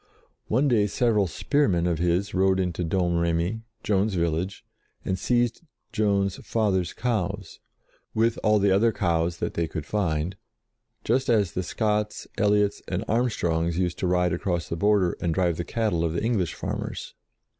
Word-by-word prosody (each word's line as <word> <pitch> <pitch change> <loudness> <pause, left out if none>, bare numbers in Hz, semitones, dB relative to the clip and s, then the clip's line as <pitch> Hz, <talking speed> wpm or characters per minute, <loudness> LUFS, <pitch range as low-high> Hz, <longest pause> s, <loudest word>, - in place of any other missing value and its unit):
One 130 +7 +2
day 110 -6 +3
several 105 -3 +2
spearmen 95 - +1
of 85 -3 0
his 90 +4 0
rode 95 0 +3
into 90 -1 -1
Domremy, 85 +3 0 0.2
Joan's 100 0 +1
village, 85 +2 -1 0.4
and 95 0 -1
seized 120 +1 +1 0.3
Joan's 100 -3 +1
father's 95 -6 0
cows, 115 -7 -3 0.6
with 115 +1 +2
all 110 0 +4
the 100 -1 +3
other 110 +4 +4
cows 85 -4 0
that - - -3
they 85 -1 -1
could 80 -1 -5
find, 85 -2 -1 0.7
just 130 +1 +1
as 105 -7 +3
the 90 - -2
Scotts, 105 +2 -1
Elliots, 105 0 +2
and 95 +4 -2
Armstrongs 85 -8 0
used 90 -1 -1
to 95 - 0
ride 90 -1 +2
across 85 -5 -1
the - - -2
Border 100 0 +2
and 85 -2 0
drive 90 -3 +1
the 85 - -2
cattle 105 -5 -1
of 80 -1 0
the 85 - -2
English 110 -7 0
farmers. - - -5
95 Hz, 155 wpm, -26 LUFS, 85-105 Hz, 0.7 s, all